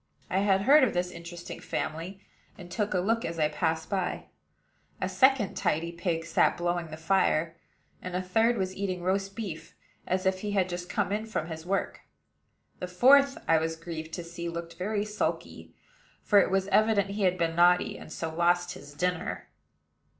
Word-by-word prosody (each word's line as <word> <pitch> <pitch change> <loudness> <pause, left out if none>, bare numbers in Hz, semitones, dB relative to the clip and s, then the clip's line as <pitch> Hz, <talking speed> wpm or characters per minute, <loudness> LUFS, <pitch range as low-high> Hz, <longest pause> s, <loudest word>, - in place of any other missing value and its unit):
I 190 - +2
had 195 -1 +3
heard 285 +4 +7
of 245 - +1
this 180 0 0
interesting 170 0 -8
family, 175 +5 -4 0.3
and 175 -3 -11
took 205 +2 -1
a - - +3
look 225 +5 +1
as 165 0 -4
I 155 -1 +2
passed 160 +1 -1
by. 190 -3 -2 0.7
A - - -1
second 265 -7 +3
tidy 165 +2 0
pig 170 -1 -2
sat 165 - +2
blowing 175 -1 -1
the 155 0 -8
fire; 165 -1 +1 0.5
and 180 0 -5
a 180 - 0
third 225 +6 +2
was 190 -1 -2
eating 185 -3 -3
roast 195 +1 -1
beef, 195 -8 -6 0.3
as 185 +1 0
if 190 0 +1
he 205 +1 -3
had 190 -2 +1
just 175 0 -5
come 200 -2 -1
in 215 +2 -2
from 175 -6 -3
his 160 +1 -7
work. 195 +1 -1 0.8
The 180 - -4
fourth, 270 +9 +5
I 165 -1 +5
was 160 +1 -2
grieved 160 -1 -7
to 175 - -4
see, 170 0 -6
looked 170 0 -6
very 205 +4 -2
sulky; 210 0 -4 0.5
for 205 - +5
it - - +3
was 190 0 +1
evident 205 -1 +3
he 205 +1 -4
had 185 -1 +2
been 165 -2 0
naughty, 175 +1 +4
and - - -11
so 160 0 -4
lost 175 +1 +2
his 145 -6 -12
dinner. 180 +2 -2
180 Hz, 185 wpm, -28 LUFS, 170-200 Hz, 0.8 s, heard